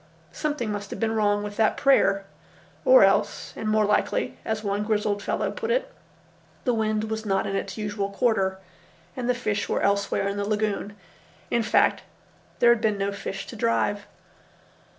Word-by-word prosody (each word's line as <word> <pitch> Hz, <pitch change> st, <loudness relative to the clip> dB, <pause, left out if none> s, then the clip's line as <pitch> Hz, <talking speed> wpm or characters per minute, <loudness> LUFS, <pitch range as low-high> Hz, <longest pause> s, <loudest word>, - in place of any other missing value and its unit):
Something 290 Hz, -8 st, -2 dB
must 205 Hz, -1 st, -5 dB
have -, -, -6 dB
been 225 Hz, -1 st, 0 dB
wrong 205 Hz, -2 st, +1 dB
with 205 Hz, 0 st, -6 dB
that 220 Hz, -1 st, +2 dB
prayer; 200 Hz, -8 st, +3 dB, 0.6 s
or -, -, +8 dB
else, -, -, +1 dB
and 215 Hz, -, -3 dB
more 215 Hz, 0 st, +3 dB
likely, 210 Hz, -, 0 dB
as 220 Hz, -1 st, -3 dB
one 200 Hz, 0 st, -1 dB
grizzled 210 Hz, -1 st, 0 dB
fellow -, -, -1 dB
put 455 Hz, -, -5 dB
it, -, -, 0 dB, 0.7 s
the 250 Hz, -, +1 dB
wind 215 Hz, -1 st, 0 dB
was 220 Hz, 0 st, -3 dB
not 195 Hz, -3 st, 0 dB
in 195 Hz, -, -2 dB
its 195 Hz, -, -4 dB
usual 205 Hz, -2 st, -2 dB
quarter 200 Hz, -3 st, +1 dB, 0.6 s
and 250 Hz, -1 st, -3 dB
the 250 Hz, -, +3 dB
fish 215 Hz, -4 st, -2 dB
were -, -, 0 dB
elsewhere 200 Hz, 0 st, +1 dB
in 200 Hz, 0 st, -3 dB
the 205 Hz, -, -1 dB
lagoon. 210 Hz, -1 st, -1 dB, 0.5 s
In 235 Hz, -, +2 dB
fact, 220 Hz, 0 st, +3 dB, 0.6 s
there 235 Hz, -, +6 dB
had 230 Hz, -, -4 dB
been 215 Hz, -3 st, +1 dB
no 200 Hz, 0 st, -1 dB
fish 195 Hz, -1 st, -5 dB
to -, -, -9 dB
drive. 205 Hz, -2 st, 0 dB
215 Hz, 175 wpm, -25 LUFS, 205-230 Hz, 0.7 s, or